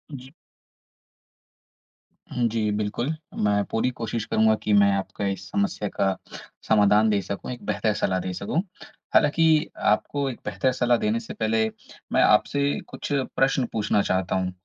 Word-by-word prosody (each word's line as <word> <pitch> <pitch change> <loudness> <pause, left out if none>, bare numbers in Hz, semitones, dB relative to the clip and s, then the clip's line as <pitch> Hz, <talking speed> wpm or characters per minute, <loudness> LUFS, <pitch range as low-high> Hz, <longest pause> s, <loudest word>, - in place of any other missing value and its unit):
जी। 130 +1 -11 2.0
उम, 120 -1 +1
जी 110 -1 -1
बिल्कुल। 105 +8 -2 0.3
मैं 100 -1 +2
पूरी 115 +3 +1
कोशिश 115 -1 -3
करूँगा 110 0 +3
कि 105 - +1
मैं 100 0 +5
आपका 95 +1 -4
इस 95 -1 -4
समस्या 100 +1 -1
का 95 -1 0 0.5
समाधान 105 0 +4
दे 100 -2 +2
सकूँ, 100 +6 -5
एक 125 - -8
बेहतर 110 -2 0
सलाह 95 -2 0
दे 90 0 -4
सकूँ 100 - -1 0.5
हालाँकि 160 +1 +4 0.2
आपको 140 +5 0
एक 125 - -7
बेहतर 130 - 0
सलाह 125 -1 +2
देने 110 +1 0
से 115 - -8
पहले, 110 0 +1 0.5
मैं - - +4
आपसे 140 +6 +2
कुछ - - -7
प्रश्न 135 -1 +1
पूछना 105 -2 +1
चाहता 95 -1 0
हूँ। 90 -1 -1
110 Hz, 150 wpm, -25 LUFS, 100-125 Hz, 2.0 s, मैं